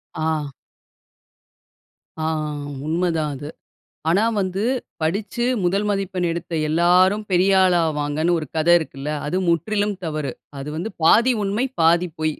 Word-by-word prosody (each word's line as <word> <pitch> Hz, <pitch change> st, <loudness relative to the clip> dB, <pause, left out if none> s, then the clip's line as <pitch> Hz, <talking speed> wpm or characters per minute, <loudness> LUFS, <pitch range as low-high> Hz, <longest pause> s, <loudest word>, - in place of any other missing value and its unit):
ஆ. 155 Hz, -2 st, -1 dB, 1.7 s
ஆ 155 Hz, -, -2 dB, 0.2 s
ஆ -, -, -3 dB, 0.4 s
உண்ம 170 Hz, +3 st, 0 dB
தான் 150 Hz, -2 st, -1 dB
அது. 145 Hz, +3 st, -7 dB, 0.6 s
ஆனா 195 Hz, +7 st, +3 dB, 0.2 s
வந்து 190 Hz, +1 st, -2 dB, 0.4 s
படிச்சு 200 Hz, +8 st, -1 dB, 0.2 s
முதல் 195 Hz, +4 st, +1 dB
மதிப்பெண் 190 Hz, -3 st, -1 dB
எடுத்த 170 Hz, 0 st, -6 dB, 0.2 s
எல்லாரும் 180 Hz, +6 st, +3 dB
பெரிய 185 Hz, +2 st, +4 dB
ஆள் 180 Hz, -1 st, +4 dB
ஆவாங்கன்னு 155 Hz, +2 st, 0 dB
ஒரு 155 Hz, -, -5 dB
கதை 170 Hz, +2 st, +4 dB
இருக்குல்ல, 150 Hz, -2 st, -6 dB, 0.2 s
அது 165 Hz, -, -1 dB
முற்றிலும் 205 Hz, +4 st, 0 dB
தவறு. 150 Hz, -5 st, -3 dB, 0.3 s
அது 140 Hz, -, -6 dB
வந்து 180 Hz, +7 st, -3 dB
பாதி 235 Hz, +9 st, +5 dB
உண்ம 210 Hz, +6 st, 0 dB, 0.2 s
பாதி 170 Hz, +2 st, +4 dB
பொய். 155 Hz, -1 st, 0 dB
175 Hz, 135 wpm, -22 LUFS, 155-195 Hz, 1.7 s, பாதி